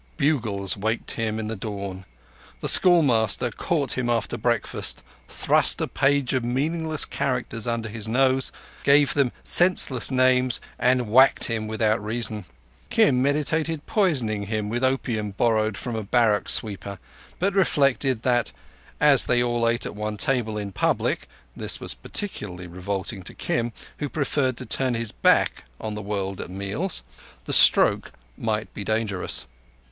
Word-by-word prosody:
Bugles 115 - 0
waked 110 +3 -3
him 110 -1 -3
in 110 -1 -4
the 115 - -4
dawn; 100 -2 -7 0.5
the - - -2
schoolmaster 125 - +5
caught 145 +5 -1
him 120 -1 -2
after 120 0 -1
breakfast, 120 -1 -2 0.3
thrust - - +3
a - - -1
page 140 -1 0
of 130 -2 0
meaningless 155 +6 -1
characters 125 -3 -3
under 115 -1 -2
his 110 0 -6
nose, 130 +3 +1 0.3
gave 140 0 +4
them 140 -4 +1
senseless 175 -8 +4
names 130 -1 +2 0.2
and 125 -1 +2
whacked 130 +5 +4
him 110 -2 -1
without 110 0 0
reason. 110 -2 -3 0.4
Kim 125 -3 +3
meditated 150 +2 -1
poisoning 125 - 0
him 105 -1 -3
with 120 +3 -3
opium 120 -5 -1
borrowed 110 0 0
from 120 -2 -5
a 110 - -3
barrack 105 -1 +1
sweeper, 100 -2 0 0.4
but 195 +2 0
reflected 140 - +1
that, 120 -2 +1 0.5
as 145 -3 +5
they 120 0 +2
all 120 -1 0
ate 115 0 -1
at - - -6
one 105 0 -4
table 120 -5 0
in 100 -1 -5
public - - -1 0.3
(this - - -2
was - - -4
peculiarly 100 - -5
revolting 95 +3 -5
to - - -8
Kim, 120 0 -2 0.3
who 145 - -3
preferred 135 -3 -1
to 130 - -6
turn 130 +2 0
his 115 -2 -2
back - - +1
on 110 - -5
the 105 - -6
world 100 -2 -4
at - - -8
meals), 100 - -4 0.4
the - - -3
stroke - - +5 0.2
might 110 -1 -3
be 105 - -6
dangerous. 110 - -1
115 Hz, 150 wpm, -23 LUFS, 105-135 Hz, 0.5 s, schoolmaster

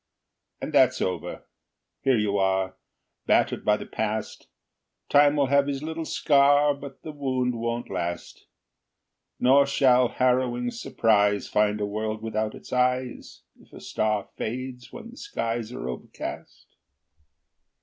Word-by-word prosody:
And - - -6
that's - - +4
over. 90 - -3 0.6
Here 135 -3 +3
you 105 -2 0
are, 95 0 +1 0.5
Battered - - +2
by 105 0 +3
the - - -8
past. 110 0 -4 0.6
Time 145 0 +5
will 145 -2 +3
have 140 +1 +3
his 140 0 -3
little 160 +1 -4
scar, 145 0 +4
But 140 -1 -11
the 155 - -6
wound 130 -4 -1
won't 115 +1 -3
last. 85 -2 -5 0.9
Nor 140 +2 +5
shall 130 -3 +4
harrowing 125 -1 +1
surprise 105 -4 +1
Find 105 0 +1
a 105 - 0
world 110 +1 -3
without 110 -1 -2
its - - -11
eyes 125 0 -1 0.2
If - - -23
a - - -10
star 105 -2 -1
fades 125 +2 -5
when 235 -1 -10
the 250 - -15
skies 115 - -3
Are 65 - -6
overcast. 65 - -7
125 Hz, 135 wpm, -26 LUFS, 105-140 Hz, 0.9 s, Time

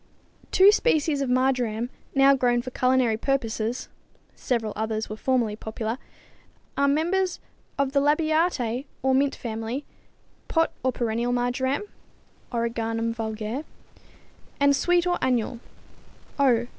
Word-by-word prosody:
= - - -30
Two 385 +2 +7
species 310 - +2
of 270 - -1
marjoram 250 -2 +1 0.2
now 270 0 +6
grown 245 -2 +2
for 255 - -6
culinary 255 -3 +2
purposes 235 -2 -1 0.5
(several 225 -4 -1
others 220 0 -2
were - - -3
formerly 235 -2 0
popular) 220 +2 -4 0.8
are 280 - +2
members 350 +6 +1 0.4
of 280 -1 +1
the 280 - +3
Labiatæ 295 -4 +1 0.2
or 265 0 +3
mint 275 +1 +2
family 225 +4 -4 0.6
pot 325 0 +2
or 260 - +2
perennial 235 0 -1
marjoram 250 +6 0 0.7
(Origanum 230 -1 -1
vulgare, 220 0 -4
Linn.) 300 - -6 0.9
and 280 0 +5
sweet 350 +4 +2
or 355 0 +1
annual 245 -2 0 0.8
(_O. 240 -4 +3
255 Hz, 125 wpm, -25 LUFS, 230-280 Hz, 0.9 s, Two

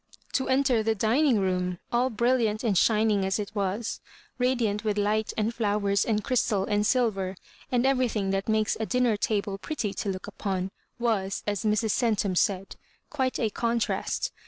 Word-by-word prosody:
To 265 - 0
enter 260 -3 +3
the 220 0 +1
dining 235 +4 +3
room, 180 -1 0
all 245 +2 +2
brilliant 235 -2 +1
and 220 -5 +1
shining 215 +1 +3
as 190 0 0
it 210 -2 -4
was, 205 +2 -2 0.4
radiant 235 -5 +1
with 210 -1 0
light 210 +1 +1
and 220 +2 0
fiowers 205 -3 +1
and 215 -2 0
crystal 225 -6 +1
and 210 0 +1
silver, 195 -7 +1 0.4
and 245 0 +2
everything 245 -7 +1
that 195 +2 -1
makes 215 -1 +2
a 220 - -2
dinner 250 -3 +2
table 200 -1 -1
pretty 215 -6 -3
to 205 - -3
look 185 -1 -4
upon, 190 -1 -3 0.3
was, 215 -5 -1
as 205 0 -2
Mrs. 215 +1 +2
Centum 210 -5 +1
said, 195 +1 0 0.3
"quite 260 -3 0
a 225 -3 0
contriast." 235 - -1
215 Hz, 165 wpm, -27 LUFS, 200-235 Hz, 0.4 s, enter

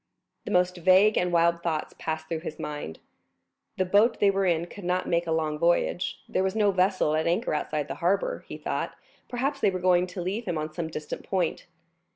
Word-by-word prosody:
The - - -4
most 180 0 +2
vague 190 +5 +5
and 180 0 +1
wild 170 0 +3
thoughts 160 -3 -2
passed 160 0 -3
through 165 -1 -2
his 155 -2 -7
mind. 145 - -5 0.8
The 185 - +1
boat 210 +5 +3
they 200 -1 +5
were 195 -1 +1
in 170 -1 +1
could 200 +3 -11
not 180 +1 0
make 170 0 +1
a - - -1
long 155 -2 0
voyage; 175 +2 +1
there - - 0
was 190 +1 0
no 210 -2 +3
vessel 185 -4 +2
at 160 +1 0
anchor 175 +6 0
outside 150 -1 -2
the 135 - -4
harbor; 200 - 0
he - - -7
thought, - - -3 0.3
perhaps, 265 +4 -1
they - - +3
were 185 - -2
going 180 0 +3
to 180 +1 -8
leave 200 +6 -3
him 175 -3 -2
on 155 0 -4
some 165 0 -3
distant 155 -2 -6
point. 180 -4 -1
175 Hz, 210 wpm, -27 LUFS, 160-190 Hz, 0.8 s, vague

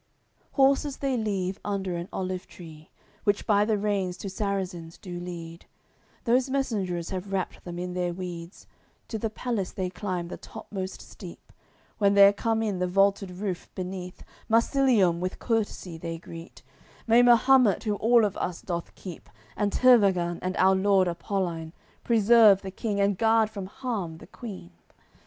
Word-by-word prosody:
CXCV - - -39
Horses 275 +1 +3
they 270 -2 -1
leave 195 -4 -2
under 195 -3 -2
an 170 +1 -5
olive 185 -1 -4
tree, 160 -3 -13 0.3
Which 205 0 +1
by 205 -1 +3
the 215 -1 +1
reins 200 -3 -1
two 195 - -6
Sarrazins 185 -4 -3
do 175 -3 -7
lead; 170 -1 -8 0.6
Those 250 +3 +2
messengers 200 -11 -2
have 190 +1 -5
wrapped 190 -2 -3
them 175 -1 -7
in 180 0 -4
their 180 -1 -1
weeds, 175 0 -7 0.4
To 220 - -3
the 225 - -1
palace 220 -4 -3
they 185 -2 -3
climb 180 -3 -3
the - - -6
topmost 190 -2 -7
steep. - - -12 0.5
When 200 -1 +4
they're 200 0 +8
come 225 +2 0
in, 205 -4 -2
the 180 - 0
vaulted 195 +1 +2
roof 180 0 -5
beneath, 180 -1 -6 0.3
Marsilium 230 -6 +3
with 185 +1 -3
courtesy 205 -7 -2
they 165 0 -5
greet: 165 +1 -11 0.4
"May 230 +1 +6
Mahumet, 245 -2 +5
who 210 - 0
all 230 +1 +4
of 200 - -2
us 175 -2 -3
doth 170 -2 -4
keep, 180 -4 -10 0.3
And 205 -1 0
Tervagan, 195 -9 +4
and 185 0 -3
our 190 +1 +5
lord 190 -1 +3
Apoline 170 -2 -3 0.3
Preserve 220 -3 +5
the, 190 - -5
king 205 +1 -3
and 200 -1 +1
guard 225 -1 +3
from 200 -3 -6
harm 200 -8 -4
the - - -13
queen!" 200 - -9
195 Hz, 160 wpm, -27 LUFS, 180-220 Hz, 0.6 s, they're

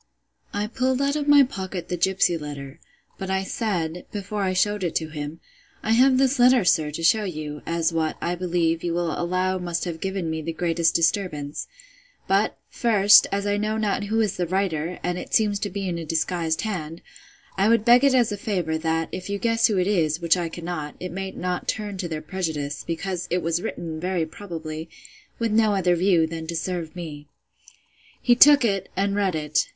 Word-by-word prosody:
I 205 +1 -2
pulled 255 +4 0
out 280 +1 +1
of 295 -1 -2
my 290 -1 +8
pocket 190 -8 -5
the 180 - -2
gipsy 180 0 +2
letter; 145 -1 -7 0.4
but 190 - -4
I 190 0 0
said, 180 -6 -3
before 205 0 -4
I 190 -1 +1
shewed 205 +2 +1
it 175 - -2
to 160 -1 -1
him, 150 +1 -6 0.4
I 220 - 0
have 255 +3 +5
this 265 0 +2
letter, 245 -3 +5
sir, 155 -3 +3
to 155 +3 -6
shew 210 +6 +4
you, 150 -5 -5
as 165 0 0
what, 160 -1 -1
I 175 - -1
believe, 170 -2 0
you 170 -1 -1
will 170 -1 0
allow 185 +3 -1
must 175 -1 -2
have 170 -2 -5
given 190 -3 -2
me 160 0 -2
the 165 +1 -4
greatest 165 -1 +1
disturbance: 165 -5 0 0.6
but, 195 +3 +1
first, 205 -4 +5
as 200 0 -1
I 205 0 +1
know 215 +1 -1
not 205 -1 -1
who 220 +2 0
is 210 -4 -1
the 175 -1 -1
writer, 180 -2 -1
and 180 0 -1
it - - -3
seems 210 -2 +2
to 205 - -2
be 195 0 -4
in 170 -2 -2
a - - -5
disguised 165 +1 -1
hand, 170 -7 -5 0.5
I 195 +3 +2
would 230 -1 +3
beg 245 +2 +6
it 275 -2 +5
as 240 -3 +3
a 205 - -3
favour, 180 -6 -2
that, 165 0 0
if 185 +1 -6
you 200 - -1
guess 230 +1 +2
who 210 - 0
it 180 - +2
is, 165 -6 +1
which 170 -1 +3
I 175 -2 -2
cannot, 165 -3 -5
it 180 - -5
may 190 +2 -4
not 180 -1 -4
turn 205 -2 -3
to 185 -2 -3
their 155 -2 -5
prejudice, 155 -5 -3
because 175 +1 -4
it 180 0 0
was 165 +1 0
written, 160 -3 -5
very 180 -1 -1
probably, 160 -2 -7 0.5
with 230 -2 -1
no 215 -1 +3
other 180 -2 +2
view, 175 -2 +3
than 160 0 -6
to 170 - -4
serve 175 -1 -3
me. 150 -4 -8 0.9
He 245 - +4
took 285 +2 +7
it, 195 -3 -1
and 200 +1 +1
read 195 -4 +1
it. 150 -1 0
180 Hz, 210 wpm, -24 LUFS, 165-205 Hz, 0.9 s, my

